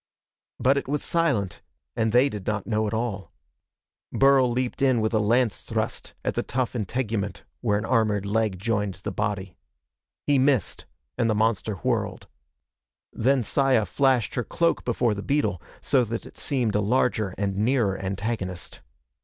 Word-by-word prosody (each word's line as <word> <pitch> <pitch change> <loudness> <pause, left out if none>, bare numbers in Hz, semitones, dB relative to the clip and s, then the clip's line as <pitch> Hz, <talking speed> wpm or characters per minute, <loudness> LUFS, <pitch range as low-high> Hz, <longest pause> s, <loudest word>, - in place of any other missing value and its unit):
But 135 +2 +3
it - - -2
was 145 +1 -1
silent, 140 - 0 0.3
and 110 -1 +1
they 125 +4 +5
did 105 -8 -6
not 105 -1 -1
know 110 -1 0
at 105 - -3
all. 110 -4 -3 0.8
Burl 135 -2 +4
leaped 125 +1 -2
in 130 -3 +4
with 110 +1 0
a 110 - +3
lance 115 +1 +2
thrust - - -4
at - - 0
the - - 0
tough 130 0 -2
integument 105 -4 -2 0.2
where 105 -4 +1
an 105 - -3
armored 110 -5 +1
leg 105 -1 0
joined 105 -1 -1
the 100 +2 -6
body. 100 -2 -3 0.7
He 145 -2 +3
missed, 130 - +1 0.3
and 115 -2 +2
the 110 - +2
monster 110 -1 +1
whirled. 85 - -2 0.9
Then 130 +2 +2
Saya 130 -1 +2
flashed 130 -3 +1
her 120 - -1
cloak 170 +8 0
before 120 -2 +1
the 100 - -5
beetle, 105 - 0 0.2
so 135 -3 +3
that 115 +1 -4
it - - -13
seemed 125 -7 0
a 105 - +2
larger 110 -3 +1
and 100 -1 -1
nearer 110 -2 +2
antagonist. 95 -2 -4
110 Hz, 160 wpm, -25 LUFS, 105-130 Hz, 0.9 s, they